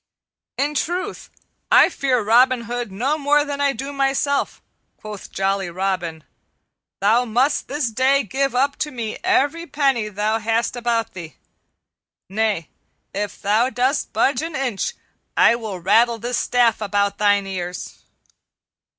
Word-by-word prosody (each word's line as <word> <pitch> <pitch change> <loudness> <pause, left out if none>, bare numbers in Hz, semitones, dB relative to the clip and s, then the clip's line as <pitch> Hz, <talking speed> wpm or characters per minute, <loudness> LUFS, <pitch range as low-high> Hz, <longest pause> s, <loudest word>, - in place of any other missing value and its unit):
"In 290 +2 0
truth 350 +6 -3 0.4
I - - +7
fear 260 - 0
Robin 245 +3 +4
Hood 240 -1 -4
no 265 +10 -1
more 290 +1 +3
than 285 -1 -4
I 280 -1 +3
do 275 +3 -6
myself," 275 +1 0 0.4
quoth 210 -2 -9
jolly 195 -1 -1
Robin. 175 -3 -3 0.8
"Thou 220 +5 +4
must 250 +6 +1
this 280 -4 -2
day 265 +4 +3
give 270 +5 -1
up 275 +2 +1
to 300 - -2
me 230 -5 -5
every 335 -2 +1
penny 270 -8 +1
thou 210 +2 -1
hast 225 +2 0
about 235 -2 -1
thee. 170 -4 -9 0.9
Nay, 205 -5 -1 0.4
if 205 0 -4
thou 215 +5 +3
dost 255 +4 0
budge 265 -2 +1
an 325 0 -5
inch 255 -7 -2 0.4
I - - +6
will 215 -6 -5
rattle 230 +6 +3
this 240 +2 -2
staff 240 -3 +2
about 200 -1 0
thine 205 -1 +3
ears." 180 -2 -6
235 Hz, 140 wpm, -21 LUFS, 205-275 Hz, 0.9 s, I